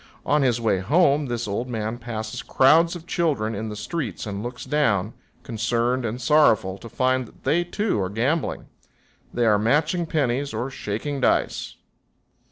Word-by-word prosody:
On 150 0 +3
his 125 -3 +2
way 110 -5 +1
home 145 - +3
this 120 -2 -3
old 115 +5 -3
man 110 0 -3
passes 110 -2 -5
crowds 165 +6 +4
of 170 -1 -9
children 145 - 0
in 110 +1 -4
the 105 - -6
streets 115 - -4
and 100 -1 -4
looks 120 +2 -6
down, 115 -9 +1 0.3
concerned 120 +2 0
and 115 +2 -3
sorrowful, 120 -9 +3
to 115 - -10
find 130 +1 0
that - - -20
they, 170 +3 +2
too, 190 - -1
are 95 - -1
gambling. 125 - -1 0.7
They 120 - 0
are 105 -2 +4
matching 150 - +1
pennies 140 -2 -1
or 130 +3 -3
shaking 135 +5 -4
dice. - - 0
120 Hz, 165 wpm, -24 LUFS, 110-150 Hz, 0.7 s, crowds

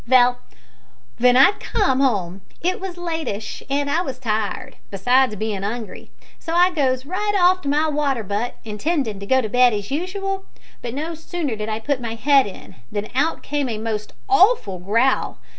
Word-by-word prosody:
"Vell, 245 0 +5 0.8
w'en 250 +1 +5
I 270 +8 +8
com'd 320 - +1
'ome 195 -8 0 0.2
it 365 +2 -1
was 375 -2 -6
lateish 320 -12 -4
and 285 +1 0
I 315 +4 +1
was 270 -8 -5
tired, 220 +2 -3
besides 245 +4 +2
bein' 210 -2 -3
'ungry; 220 0 -5 0.3
so 330 -1 -4
I 355 +1 +5
goes 265 -5 0
right 410 +6 -1
off 365 +1 +4
to 280 - -3
my 300 +2 +2
water 285 -6 0
butt, 205 +5 -3
intendin' 225 - -2
to 200 - -8
go 260 +2 +4
to 220 - -3
bed 245 +2 +4
as 205 +2 -5
usual, 385 +5 -3 0.4
but 240 0 -5
no 315 +4 -3
sooner 325 -5 -4
did 215 0 -4
I 215 0 -2
put 265 +3 -1
my 230 -1 -4
head 270 +2 +4
in, 195 - -11
than 205 +1 -3
out 290 +6 0
came 285 -2 -2
a 220 - -3
most 215 -1 -4
awful 390 - +3
growl. 230 +8 +1
260 Hz, 180 wpm, -21 LUFS, 220-320 Hz, 0.8 s, I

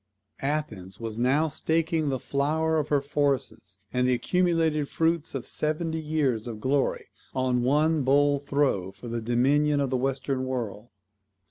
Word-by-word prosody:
Athens 115 -10 -3
was 115 -1 -4
now 135 +6 +3
staking 160 0 0
the 135 - 0
flower 155 +5 0
of 150 - -2
her 145 -2 +2
forces, 140 -1 -1 0.2
and 125 0 +2
the 125 - +3
accumulated 165 -1 +1
fruits 165 -2 0
of 130 - -4
seventy 160 +1 -1
years 145 -8 0
of 110 -3 -6
glory, 135 +4 0 0.3
on 130 -1 +1
one 150 +5 +2
bold 140 +1 +3
throw 140 -11 +1
for 120 - -11
the 115 0 -3
dominion 140 +6 +2
of 140 -2 0
the 130 - +2
Western 135 0 -1
world. 120 -3 -4
140 Hz, 150 wpm, -27 LUFS, 125-155 Hz, 0.3 s, now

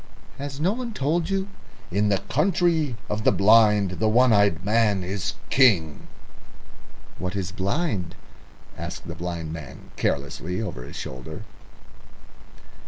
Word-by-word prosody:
"Has 140 0 -5
no 175 +5 +2
one 240 -1 -5
told 160 +5 0
you, 195 0 -1 0.4
'In 105 +3 +2
the 100 - +3
Country 160 -4 +1
of 105 +1 -2
the - - +5
Blind 105 -3 +4
the 110 - +2
One 120 +2 +5
eyed 100 -4 +3
Man 105 -3 +2
is 95 +1 -3 0.2
King'?" 95 - +3 1.1
"What 90 +2 -3
is 95 -3 -3
blind?" 100 - -2 0.6
asked - - -7
the 85 - -5
blind 85 -2 -5
man 75 -5 -10
carelessly 75 +6 -2
over 105 - -5
his - - -10
shoulder. 65 -1 -7
105 Hz, 130 wpm, -24 LUFS, 90-135 Hz, 1.1 s, the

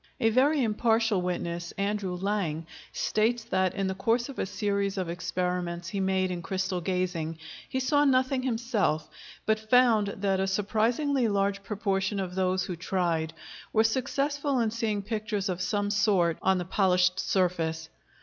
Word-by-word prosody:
A 225 -3 +3
very 275 +4 +3
impartial 225 -2 +2
witness, 175 -1 -3
Andrew 200 -2 -1
Lang, 180 -5 -2 0.3
states 225 +2 0
that, 190 -5 0
in 195 -1 -1
the 190 - -1
course 230 +6 0
of 275 - -8
a - - -1
series 200 -1 -1
of 185 -3 -2
experiments 175 0 -2
he 200 - -3
made 190 -1 +1
in 175 -1 -4
crystal 185 0 -2
gazing, 175 -3 -2 0.3
he 260 - -1
saw 290 +3 +3
nothing 260 -1 +2
himself, 225 -10 0 0.4
but 220 0 +2
found 235 -4 +5
that 195 -1 -1
a 190 - +1
surprisingly 230 +7 +1
large 200 -1 0
proportion 195 -1 -1
of 185 -2 -3
those 185 0 +1
who 180 - -4
tried 170 -3 -1 0.4
were 220 - +5
successful 275 +4 0
in 225 -2 +1
seeing 215 -3 -1
pictures 210 -2 -2
of 185 0 -2
some 205 +2 0
sort 200 -5 +2
on 190 0 +3
the 180 - -3
polished 185 -1 +2
surface. 165 -4 0
195 Hz, 160 wpm, -28 LUFS, 180-225 Hz, 0.4 s, found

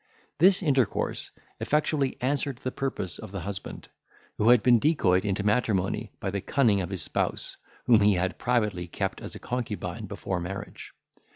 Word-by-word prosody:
This 185 +3 +5
intercourse 135 - 0 0.3
effectually 150 -2 +1
answered 140 0 0
the 130 - -2
purpose 130 -11 -3
of - - -9
the 100 -2 -5
husband, 100 +1 -6 0.5
who 110 - +4
had 120 -3 +6
been 120 -2 +6
decoyed 95 - +3
into 100 0 -1
matrimony 105 -1 0
by 95 - -3
the 100 0 -2
cunning 110 -6 +2
of 90 - -4
his 95 -3 -2
spouse, - - -2 0.3
whom 115 -3 +6
he 100 -1 +5
had 90 +1 -1
privately 105 -8 0
kept - - -3
as - - -8
a - - -8
concubine 110 -4 -4
before 95 -2 -3
marriage. 95 +3 -7
105 Hz, 165 wpm, -27 LUFS, 95-125 Hz, 0.5 s, had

